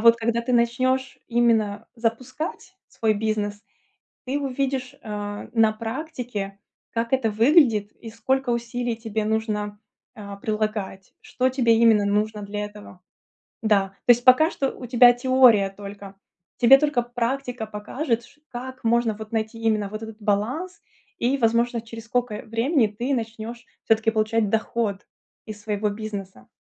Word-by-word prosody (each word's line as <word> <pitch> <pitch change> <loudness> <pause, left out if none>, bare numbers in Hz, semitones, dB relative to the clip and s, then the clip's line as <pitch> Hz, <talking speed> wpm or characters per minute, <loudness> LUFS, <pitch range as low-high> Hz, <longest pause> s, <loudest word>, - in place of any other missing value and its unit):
вот 230 0 +7
когда 235 0 -1
ты 250 - -2
начнёшь 255 +3 +1
именно 225 -3 +1
запускать 255 +10 -4
свой 220 -1 0
бизнес, 210 0 -2 0.6
ты 270 +3 -1
увидишь, 270 -2 -2
э, 205 -1 -6
на 225 -2 +4
практике, 225 -4 -5 0.3
как 230 +2 -2
это 255 -4 +2
выглядит 225 - +4
и 225 - -11
сколько 260 +3 -1
усилий 235 0 -2
тебе 220 -2 -3
нужно, 210 -1 -2 0.4
э, 200 -2 -8
прилагать, 215 -3 -3
что 255 +1 0
тебе 245 -3 +3
именно 225 -2 +5
нужно 210 +1 0
для 205 +1 -4
этого, 205 -3 -11 0.6
да. 205 -3 +3 0.2
То - - +4
есть 240 +1 -1
пока 265 +6 +6
что 270 -5 -1
у 250 - -7
тебя 245 0 +7
теория 245 -5 +4
только. 200 0 -10 0.4
Тебе 255 +3 +8
только 290 -4 +1
практика 245 0 -3
покажет, 230 +3 -3
ч 295 - -21
как 255 0 -8
можно 230 -1 +2
вот 220 0 -9
найти 220 0 -2
именно 215 -3 0
вот 215 +2 -7
этот 220 -1 -9
баланс 245 - -1 0.4
и, 255 +4 +1
возможно, 235 0 +2
через 225 0 -10
сколько 235 -2 -2
времени 230 +3 +2
ты 240 +7 -2
начнёшь 230 0 -5 0.2
всё-таки 225 0 +3
получать 215 -1 +1
доход 220 -2 -1 0.4
из 210 -1 -8
своего 210 -1 -1
бизнеса. 205 -2 -7
225 Hz, 145 wpm, -24 LUFS, 210-245 Hz, 0.6 s, Тебе